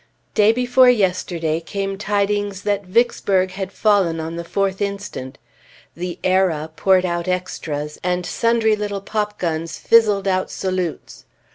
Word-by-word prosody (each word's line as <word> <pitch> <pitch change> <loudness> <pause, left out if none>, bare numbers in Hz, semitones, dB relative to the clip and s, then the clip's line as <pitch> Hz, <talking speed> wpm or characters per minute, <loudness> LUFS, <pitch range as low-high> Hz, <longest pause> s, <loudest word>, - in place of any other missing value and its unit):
Day 215 0 +5
before 250 +2 +4
yesterday 180 -7 +1
came 195 +3 -4
tidings 205 -1 -1
that 205 -2 -1
Vicksburg 190 -3 +2
had 190 0 -5
fallen 195 -7 +2
on 160 +1 -4
the 170 - -4
4th 195 +2 -1
inst. 200 0 -3 0.8
The 175 +1 -5
"Era" 180 -5 +1
poured 185 +3 +3
out 175 0 -2
extras, 155 -5 -3
and 180 0 -1
sundry 230 0 +2
little 205 -1 -4
popguns 180 -7 -2
fizzled 210 -4 +3
out 185 -1 0
salutes. 185 -3 -4
190 Hz, 130 wpm, -20 LUFS, 175-205 Hz, 0.8 s, Day